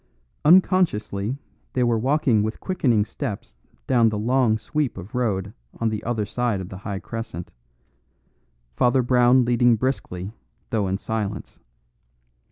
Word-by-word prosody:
Unconsciously 140 - +3 0.4
they 125 - +1
were 120 -1 +2
walking 130 -3 +2
with 110 +1 -3
quickening 125 - +1
steps 110 - -6 0.3
down 115 - +4
the 105 - -3
long 120 0 +2
sweep 150 +1 -2
of 95 +3 -9
road 105 -5 -1 0.3
on 115 - +1
the 110 -1 -4
other 115 -3 -1
side 120 -1 -1
of 95 -1 -7
the 95 - -8
high 100 0 -5
crescent, 115 -5 -6 1.2
Father 125 - +3
Brown 125 0 +4
leading 120 0 +4
briskly, 105 -6 -3 0.4
though 105 -4 +1
in 95 +1 -1
silence. 105 -1 -4
115 Hz, 135 wpm, -23 LUFS, 105-125 Hz, 1.2 s, down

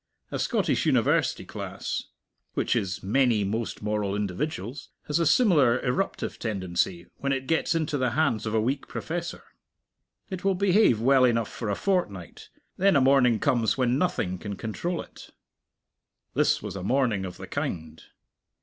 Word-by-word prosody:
A - - -3
Scottish - - +1
university - - +2
class - - -5 0.5
which - - +1
is 95 -1 -2
many 115 +1 +2
most 110 +2 -3
moral 105 -2 -1
individuals 105 - -4 0.2
has 150 +2 0
a 165 - +2
similar 150 - +4
eruptive 130 +10 -2
tendency 90 -4 -1
when 140 - -2
it 135 -1 -1
gets 165 +3 +1
into 155 -3 -1
the 130 -1 +2
hands 115 -9 +1
of 110 - -1
a - - +4
weak 135 +5 -1
professor. 170 +1 -5 0.9
It 185 -1 -5
will 195 -1 +2
behave 195 - +4
well 130 +3 +4
enough 115 -3 +2
for 115 - -4
a 100 - 0
fortnight, 100 - -2 0.3
then 195 0 +4
a - - +6
morning 130 -3 +4
comes 115 +2 +1
when 125 +1 +2
nothing 95 - -1
can 100 0 -5
control 165 - -3
it. - - -14 1.0
This - - +2
was - - -5
a 95 - -5
morning 115 -1 +1
of 90 -2 -6
the - - -8
kind. 80 -2 -4
125 Hz, 160 wpm, -26 LUFS, 105-150 Hz, 1.0 s, a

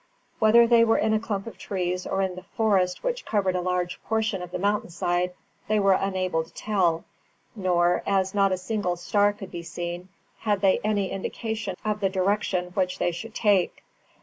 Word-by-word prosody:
Whether 225 +2 +6
they 230 0 +5
were 225 0 +3
in 220 0 +2
a 215 - +3
clump 205 -3 -3
of 230 - -9
trees 180 -2 -2
or 195 0 0
in 190 -1 -1
the 185 - -8
forest, 190 -2 0
which - - -2
covered 195 -4 0
a 180 - 0
large 180 0 -2
portion 220 -3 0
of 180 - -6
the 180 - -4
mountain 205 +1 0
side, 175 +1 -1 0.3
they 215 0 +2
were 195 -1 +4
unable 185 -4 0
to 160 - -18
tell; 180 -6 0 0.5
nor, 180 -3 +2
as 195 -1 +1
not 200 -1 +3
a 185 - +1
single 185 -1 -2
star 205 +4 +2
could 200 -2 -10
be 170 - -5
seen, 175 +2 -6 0.3
had 205 -3 0
they 195 -2 +4
any 205 -3 0
indication 215 0 -4
of 210 -1 0
the 195 -2 +1
direction 190 -1 0
which 185 0 -1
they 175 - +1
should 220 +7 -8
take. 200 -5 +2
195 Hz, 195 wpm, -26 LUFS, 180-210 Hz, 0.5 s, Whether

